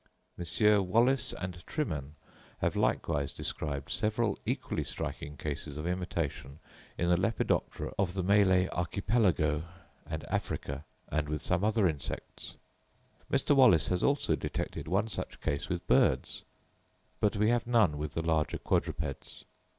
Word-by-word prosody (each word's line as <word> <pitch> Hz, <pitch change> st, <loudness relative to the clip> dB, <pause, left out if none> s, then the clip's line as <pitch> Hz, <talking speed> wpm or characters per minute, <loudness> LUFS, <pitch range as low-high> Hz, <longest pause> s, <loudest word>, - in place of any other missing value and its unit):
Messrs. 105 Hz, +5 st, +4 dB
Wallace 115 Hz, +8 st, +3 dB
and 90 Hz, -1 st, -6 dB
Trimen 75 Hz, -, -3 dB, 0.4 s
have -, -, 0 dB
likewise 70 Hz, -1 st, 0 dB
described 70 Hz, -2 st, -4 dB
several 110 Hz, -1 st, 0 dB
equally -, -, -1 dB
striking 75 Hz, 0 st, -5 dB
cases 75 Hz, 0 st, -4 dB
of 75 Hz, -, -4 dB
imitation 85 Hz, -6 st, -3 dB, 0.4 s
in 85 Hz, -, 0 dB
the 90 Hz, 0 st, +4 dB
Lepidoptera 105 Hz, +5 st, -1 dB
of 95 Hz, -2 st, +1 dB
the 95 Hz, -, -1 dB
Malay 95 Hz, -1 st, +4 dB
Archipelago 85 Hz, -5 st, +1 dB, 0.4 s
and 80 Hz, -1 st, -4 dB
Africa, 70 Hz, 0 st, -3 dB, 0.2 s
and 75 Hz, 0 st, -1 dB
with 75 Hz, 0 st, -3 dB
some 90 Hz, +1 st, +1 dB
other 110 Hz, -2 st, +3 dB
insects. 70 Hz, -5 st, -5 dB, 0.8 s
Mr. 145 Hz, -, +3 dB
Wallace 125 Hz, -, +6 dB
has 90 Hz, -1 st, 0 dB
also 140 Hz, 0 st, +2 dB
detected -, -, -4 dB
one 95 Hz, +6 st, +1 dB
such 110 Hz, -, -5 dB
case 70 Hz, +7 st, -2 dB
with 90 Hz, -2 st, -3 dB
birds, -, -, +2 dB, 0.7 s
but 105 Hz, +1 st, +2 dB
we 105 Hz, +1 st, +3 dB
have 120 Hz, -1 st, 0 dB
none 105 Hz, -12 st, +3 dB
with 75 Hz, -1 st, -4 dB
the 80 Hz, -, -1 dB
larger 80 Hz, -2 st, +1 dB
quadrupeds. 75 Hz, -3 st, -2 dB
90 Hz, 135 wpm, -31 LUFS, 75-105 Hz, 0.8 s, Wallace